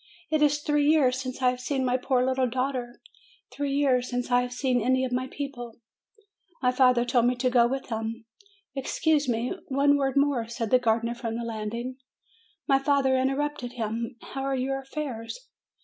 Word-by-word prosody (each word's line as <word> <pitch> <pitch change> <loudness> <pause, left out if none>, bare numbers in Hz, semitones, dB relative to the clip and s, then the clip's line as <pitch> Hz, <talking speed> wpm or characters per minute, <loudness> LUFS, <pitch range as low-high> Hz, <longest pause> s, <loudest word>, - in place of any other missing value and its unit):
It 310 -1 +2
is 295 0 +4
three 295 -1 +2
years 265 -5 +3
since 255 0 -6
I 250 - +5
have 250 - -6
seen 265 +1 -1
my 250 0 +2
poor 255 0 +1
little 260 -1 +1
daughter! 255 -1 -3 0.5
Three 285 -1 -2
years 260 -3 +2
since 245 0 -3
I 245 0 +5
have 245 0 -4
seen 250 -1 0
any 260 +3 +2
of 255 - -4
my 255 +1 -1
people 260 -5 -6 0.4
!" 395 -6 -34
My 250 - +4
father 250 -1 +4
told 245 -1 +2
me 250 - +2
to 250 +1 0
go 240 -1 +5
with 270 +1 -4
him. 225 0 -4 0.5
"Excuse 290 +1 +1
me; 235 +1 0
one 285 +1 +3
word 270 -1 0
more," 275 -5 +2
said 230 -2 -4
the 255 - +6
gardener, 230 0 +1
from 230 -1 -4
the 235 - -4
landing. 230 +3 -4 0.7
My 270 -2 +4
father 270 -1 +2
interrupted 270 -1 -1
him, 230 +1 -3
"How 270 - -6
are 270 0 -1
your 270 +1 -1
affairs?" 270 - -5
255 Hz, 190 wpm, -27 LUFS, 240-275 Hz, 0.7 s, the